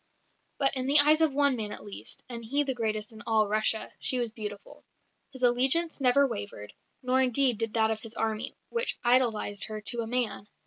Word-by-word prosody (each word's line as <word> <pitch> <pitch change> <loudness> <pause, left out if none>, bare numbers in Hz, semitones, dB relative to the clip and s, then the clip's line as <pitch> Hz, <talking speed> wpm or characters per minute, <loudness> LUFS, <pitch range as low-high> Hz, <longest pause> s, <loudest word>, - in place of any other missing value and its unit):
But 275 -1 +2
in 260 0 -1
the 285 +2 +7
eyes 305 +2 +7
of 320 -2 +3
one 280 -1 +2
man 215 -3 -5
at - - -8
least 205 - -5
and 235 -2 -7
he 280 +6 0
the 270 -2 -1
greatest 215 -2 -3
in 220 - -12
all 220 -2 +2
Russia 215 +1 0
she 255 - -1
was 240 -2 -2
beautiful. 210 -3 -9 0.5
His 260 -2 -9
allegiance 265 +7 +3
never 270 +2 +4
wavered, 205 - -7 0.3
nor 255 +1 +2
indeed 255 -2 +2
did 225 -1 -3
that 220 -1 +2
of 220 0 -4
his 225 0 -7
army, 220 0 -3
which 470 +1 -2
idolised 235 -5 +1
her 215 -1 -6
to 235 +3 -2
a 225 - -5
man. 230 -4 -2
235 Hz, 200 wpm, -28 LUFS, 215-265 Hz, 0.5 s, the